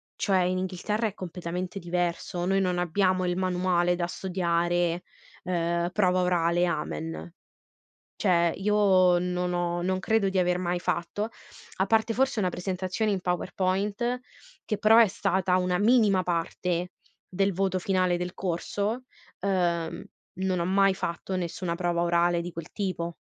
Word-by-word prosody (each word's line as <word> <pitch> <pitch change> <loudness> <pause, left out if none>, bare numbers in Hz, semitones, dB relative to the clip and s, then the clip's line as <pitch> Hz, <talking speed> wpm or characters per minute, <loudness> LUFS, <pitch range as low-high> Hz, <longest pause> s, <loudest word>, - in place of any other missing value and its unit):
cioè, 195 -3 +1
in 185 +1 0
Inghilterra, 195 +4 -1
è 205 - -6
completamente 180 0 -5
diverso. 175 0 -2
Noi 195 +1 +2
non 180 -2 0
abbiamo 185 +1 +1
il 175 0 0
manuale 180 -1 +1
da 175 -1 -1
studiare, 175 -1 0 0.4
ehm, 170 -1 0
prova 185 -2 +2
orale, 175 -1 +2
amen. 165 +1 -4 0.9
Cioè, 170 -4 +3
io 190 -3 +4
non 180 0 -1
ho 175 0 -1
non 185 +1 0
credo 220 +1 +1
di 190 - -2
aver 180 0 +2
mai 175 0 -1
fatto, 175 +6 -2 0.5
a 190 - +2
parte, 225 +2 +2
forse, 265 -1 +1
una 185 -3 +1
presentazione 185 +4 -2
in 195 -2 -1
PowerPoint, 200 +6 -1 0.5
che, 210 - -1
però, 215 +2 +5
è 230 - +7
stata 185 -1 0
una 180 -1 +1
minima 210 -3 +4
parte, 175 0 -2 0.4
del 195 +1 +1
voto 190 0 0
finale 185 -1 +1
del 180 +1 -4
corso, 200 +6 -2 0.4
ehm, 175 -4 0 0.4
non 190 -1 0
ho 170 - 0
mai 195 +1 +3
fatto 185 +1 -4
nessuna 175 0 -3
prova 175 -1 0
orale, 170 0 +2
di 175 +1 -6
quel 165 0 -8
tipo. 180 -4 -3
180 Hz, 145 wpm, -27 LUFS, 175-195 Hz, 0.9 s, è